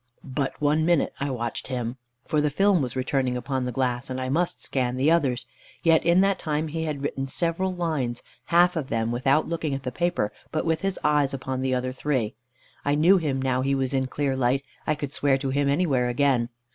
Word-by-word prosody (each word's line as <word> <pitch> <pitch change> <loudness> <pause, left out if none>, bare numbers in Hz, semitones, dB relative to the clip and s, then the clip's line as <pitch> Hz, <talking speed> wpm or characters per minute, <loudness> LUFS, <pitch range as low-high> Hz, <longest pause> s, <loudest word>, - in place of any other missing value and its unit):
But 135 0 -3
one 150 +2 +2
minute 170 -2 +2
I 140 - -1
watched 120 -3 -4
him, 125 -2 -3 0.3
for 155 -2 +1
the 150 - +2
film 195 +3 +3
was 125 -2 -3
returning 130 -1 0
upon 130 0 -2
the 125 - -2
glass, 125 0 -1
and 130 0 -3
I 130 0 -2
must 170 +6 0
scan 125 -2 -1
the 140 +5 +3
others; 130 -7 +2 0.4
yet 165 -1 +4
in 170 +2 +4
that 195 -1 +2
time 155 0 -1
he 160 +1 -3
had 145 -3 -3
written 135 -1 -2
several 170 +6 -1
lines, 155 -9 -2 0.2
half 175 +1 +4
of 155 -5 -2
them 115 0 0
without 135 +5 +2
looking 160 -4 -2
at 135 - -6
the 125 - -3
paper, 170 -9 -1 0.2
but 155 - -1
with 160 -1 +1
his 195 -1 -1
eyes 145 -2 +2
upon 130 -1 -3
the 130 -1 +1
other 130 0 -1
three. 130 -5 -1 0.5
I 145 0 +2
knew 170 +6 +5
him 140 -5 -1
now 130 -1 +1
he 135 +1 +1
was 135 0 -1
in 130 -1 +1
clear 140 0 -1
light, 130 +1 +1 0.2
I 155 - +2
could 145 -1 -5
swear 140 -2 +2
to 135 -1 -3
him 140 +1 +1
anywhere 140 -5 +2
again. 120 -2 +2
140 Hz, 220 wpm, -25 LUFS, 130-160 Hz, 0.5 s, knew